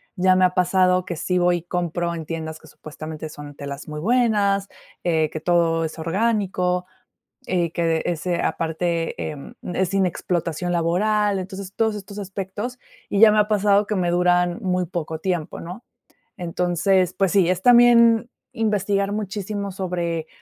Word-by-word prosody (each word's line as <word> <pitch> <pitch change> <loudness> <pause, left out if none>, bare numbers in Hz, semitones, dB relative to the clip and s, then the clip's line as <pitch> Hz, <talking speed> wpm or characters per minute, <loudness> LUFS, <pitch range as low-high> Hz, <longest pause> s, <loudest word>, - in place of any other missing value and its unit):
ya 185 0 +4
me 185 - +5
ha 180 - +1
pasado 185 0 +3
que 175 -3 -5
sí 180 +3 -1
voy 175 0 +3
y 170 - -8
compro 175 -1 -2
en 160 - -6
tiendas 160 -1 -5
que 160 - -17
supuestamente 155 0 -8
son 145 -1 -10
telas 140 0 -7
muy 150 - -5
buenas, 205 -2 +2 0.3
eh, 160 -3 +1
que 155 - -5
todo 165 -1 +2
es 160 +1 -5
orgánico, 180 0 0 0.6
eh, 175 -3 0
que 165 -2 0
este 175 +1 -1
aparte 165 0 -1
e 155 - -3 0.3
e 180 - -4
es 185 - +1
sin 195 -1 +2
explotación 175 0 -2
laboral. 200 +4 +1
Entonces, 190 0 -7
todos 220 -1 0
estos 200 0 -8
aspectos, 200 +5 -5 0.3
y 200 - +1
ya 225 - +9
me 215 - +3
ha 210 - +3
pasado 205 -1 +3
que 210 - -1
me 175 -2 0
duran 180 +2 +2
muy 180 -2 0
poco 160 -2 -4
tiempo, 175 -3 -3
¿no? 180 +8 -9 0.5
Entonces, 180 +1 +1
pues 195 0 +1
sí, 185 -4 +4
es 185 0 0
también 235 0 +6 0.3
investigar 205 -2 0
muchísimo 205 -1 -4
sobre, 175 -4 -3
180 Hz, 165 wpm, -22 LUFS, 170-200 Hz, 0.6 s, ya